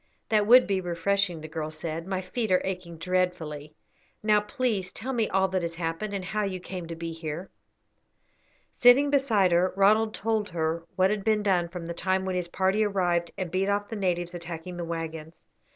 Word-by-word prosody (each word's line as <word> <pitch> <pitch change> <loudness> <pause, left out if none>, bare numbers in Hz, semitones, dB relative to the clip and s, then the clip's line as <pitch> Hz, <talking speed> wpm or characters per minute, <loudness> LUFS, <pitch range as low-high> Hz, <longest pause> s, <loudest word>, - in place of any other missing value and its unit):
"That 210 -2 +3
would 250 +2 +8
be 195 -2 0
refreshing," 180 0 0
the 155 - -7
girl 155 0 -4
said. 160 +2 -5
"My 190 -1 -2
feet 215 +3 -3
are 185 - +5
aching 180 -3 -5
dreadfully. 165 -4 -2 0.5
Now 210 -1 +4
please 210 -5 -2
tell 260 +4 -4
me 230 -3 +1
all 190 0 +2
that 185 -1 0
has 170 -1 -3
happened, 170 +5 -3
and 190 -2 -4
how 210 +3 -1
you 190 -2 -2
came 180 -1 -7
to 165 - -6
be 165 0 -5
here." 165 +2 -6 1.3
Sitting 265 +4 +6
beside 225 -10 +3
her, 175 +2 +3
Ronald 215 +3 +4
told 220 -1 -1
her 165 0 -2
what 190 +1 +3
had 210 -2 -2
been 215 -1 +2
done 180 -4 +2
from 175 -1 -7
the 170 - -4
time 185 +2 0
when 185 -1 -2
his 180 -1 -1
party 190 +4 +1
arrived 175 -4 +1
and 185 -4 -3
beat 190 +2 0
off 205 0 0
the 225 - -4
natives 175 -3 -1
attacking 175 +1 -7
the 175 - -3
waggons. 165 -1 -5
185 Hz, 200 wpm, -27 LUFS, 170-205 Hz, 1.3 s, would